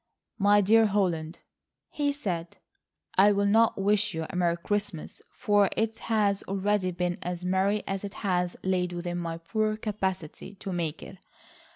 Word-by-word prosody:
"My 205 Hz, +1 st, +5 dB
dear 220 Hz, +3 st, +5 dB
Holland," 175 Hz, -5 st, -1 dB, 0.5 s
he 290 Hz, -1 st, 0 dB
said, 175 Hz, -, -4 dB, 0.6 s
"I 205 Hz, +2 st, +7 dB
will 200 Hz, 0 st, +1 dB
not 225 Hz, +1 st, +3 dB
wish 205 Hz, -1 st, +2 dB
you 160 Hz, 0 st, -2 dB
a -, -, -8 dB
Merry 170 Hz, -1 st, +1 dB
Christmas, 205 Hz, -2 st, -3 dB
for 205 Hz, -2 st, +2 dB
it 225 Hz, 0 st, -1 dB
has 210 Hz, -3 st, +1 dB
already 195 Hz, 0 st, 0 dB
been 175 Hz, 0 st, -2 dB
as 180 Hz, 0 st, -4 dB
merry 190 Hz, +3 st, +1 dB
as 195 Hz, 0 st, -3 dB
it 200 Hz, +1 st, -6 dB
has 180 Hz, -4 st, -1 dB
lain 185 Hz, -1 st, +1 dB
within 175 Hz, 0 st, -3 dB
my 165 Hz, -1 st, -4 dB
poor 215 Hz, +6 st, -1 dB
capacity 190 Hz, -4 st, -4 dB
to 195 Hz, 0 st, -6 dB
make 165 Hz, -4 st, -3 dB
it. -, -, -11 dB
195 Hz, 160 wpm, -28 LUFS, 175-210 Hz, 0.6 s, I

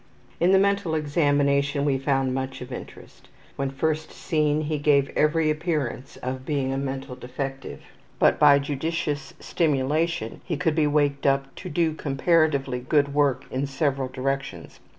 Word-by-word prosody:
In 175 Hz, +2 st, +4 dB
the 195 Hz, -, +6 dB
mental 200 Hz, -4 st, +1 dB
examination 145 Hz, -2 st, +1 dB
we 135 Hz, -2 st, +1 dB
found 135 Hz, -1 st, 0 dB
much 135 Hz, 0 st, -3 dB
of 125 Hz, +1 st, -8 dB
interest. 125 Hz, -, -10 dB, 0.3 s
When 140 Hz, 0 st, -2 dB
first 155 Hz, +3 st, -2 dB
seen 155 Hz, -2 st, 0 dB
he 155 Hz, 0 st, -2 dB
gave 140 Hz, -2 st, +3 dB
every 155 Hz, 0 st, +2 dB
appearance 150 Hz, -5 st, -3 dB
of 130 Hz, +1 st, -4 dB
being 135 Hz, -2 st, -1 dB
a -, -, -2 dB
mental 135 Hz, -1 st, -4 dB
defective, 130 Hz, -, -6 dB, 0.4 s
but -, -, +3 dB
by 145 Hz, -2 st, +7 dB
judicious 145 Hz, 0 st, -3 dB
stimulation 150 Hz, -4 st, -1 dB
he 165 Hz, -5 st, -3 dB
could 160 Hz, -1 st, +1 dB
be 155 Hz, -1 st, +2 dB
waked 145 Hz, -1 st, +1 dB
up 135 Hz, 0 st, +1 dB
to -, -, -7 dB
do 160 Hz, 0 st, +1 dB
comparatively 140 Hz, -3 st, +1 dB
good 140 Hz, +2 st, +1 dB
work 140 Hz, -2 st, +1 dB
in 135 Hz, +2 st, -1 dB
several 135 Hz, -1 st, -1 dB
directions. 135 Hz, +1 st, -4 dB
140 Hz, 150 wpm, -25 LUFS, 135-155 Hz, 0.4 s, by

